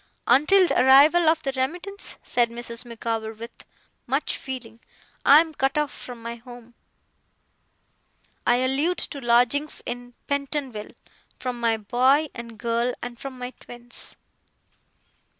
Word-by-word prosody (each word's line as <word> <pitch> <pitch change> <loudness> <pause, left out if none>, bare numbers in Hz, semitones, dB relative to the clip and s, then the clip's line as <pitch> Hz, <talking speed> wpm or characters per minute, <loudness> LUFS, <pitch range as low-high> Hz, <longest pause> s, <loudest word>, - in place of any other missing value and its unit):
Until 310 +10 +5
the - - +2
arrival 300 +6 +7
of 320 0 +1
that 270 0 -2
remittance,' 355 +10 -1
said 240 -1 +1
Mrs. 235 0 -1
Micawber 225 -1 -4
with 230 +2 -9 0.6
much - - 0
feeling, 240 -4 -7 0.5
'I 290 +3 +9
am 325 -1 -5
cut 270 0 0
off 300 -1 0
from 240 -2 -10
my 235 0 -5
home 240 0 -13 1.7
(I 240 - +4
allude 295 +7 +1
to 280 - -5
lodgings 245 +5 +2
in 245 0 -7
Pentonville), 280 -6 -3 0.5
from 250 -2 -4
my 230 -1 +2
boy 255 +8 +2
and 235 -2 -9
girl, 235 +2 -1
and 240 -1 -7
from 270 -2 -7
my 250 0 -6
twins. 240 0 -10
250 Hz, 135 wpm, -24 LUFS, 235-280 Hz, 1.7 s, I